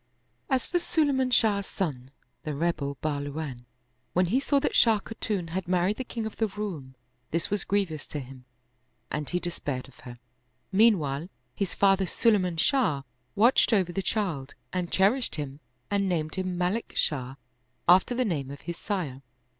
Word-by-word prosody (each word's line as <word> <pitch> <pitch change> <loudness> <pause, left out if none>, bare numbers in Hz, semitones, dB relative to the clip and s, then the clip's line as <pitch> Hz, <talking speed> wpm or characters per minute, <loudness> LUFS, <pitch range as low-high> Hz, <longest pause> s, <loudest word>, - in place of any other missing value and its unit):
As 265 -1 +2
for 350 - +1
Sulayman 285 -6 +1
Shah's 210 -5 +3
son, 135 -9 -3 0.3
the 155 -2 -4
rebel 145 -3 -1
Bahluwafi, 145 -3 -3 0.5
when 180 +1 +3
he 220 +10 +2
saw 280 +1 +2
that - - -1
Shah 225 -2 +6
Khatun 205 -5 -3
had 180 +1 -3
mar 180 -1 +2
ried 205 +3 0
the 260 - -2
king 230 -3 -4
of 220 - -6
the 220 - +2
Roum, 190 -11 -6 0.3
this 165 +3 0
was 205 - +2
grievous 190 -7 -1
to 150 - -4
him 130 -1 -10 0.7
and 150 -1 -2
he 180 - 0
despaired 145 -7 -4
of 135 - -19
her. 120 -1 -10 0.5
Meanwhile, 180 -8 +3 0.2
his 200 -4 -2
father 195 -1 +4
Sulayman 185 -5 +2
Shah 165 - +2 0.3
watched 235 +2 +5
over 185 -4 +3
the 195 - -1
child 175 -9 -2 0.2
and 180 -1 -2
cherished 220 +7 +3
him 145 -2 -5 0.3
and 200 -1 +1
named 155 -3 -1
him 185 -1 -2
Malik 180 +6 -1
Shah, 130 -3 0 0.5
after 185 +7 +5
the 255 +1 +1
name 145 - -2
of 140 0 -8
his 170 0 -5
sire. 165 -11 -3
180 Hz, 170 wpm, -28 LUFS, 150-210 Hz, 0.7 s, Shah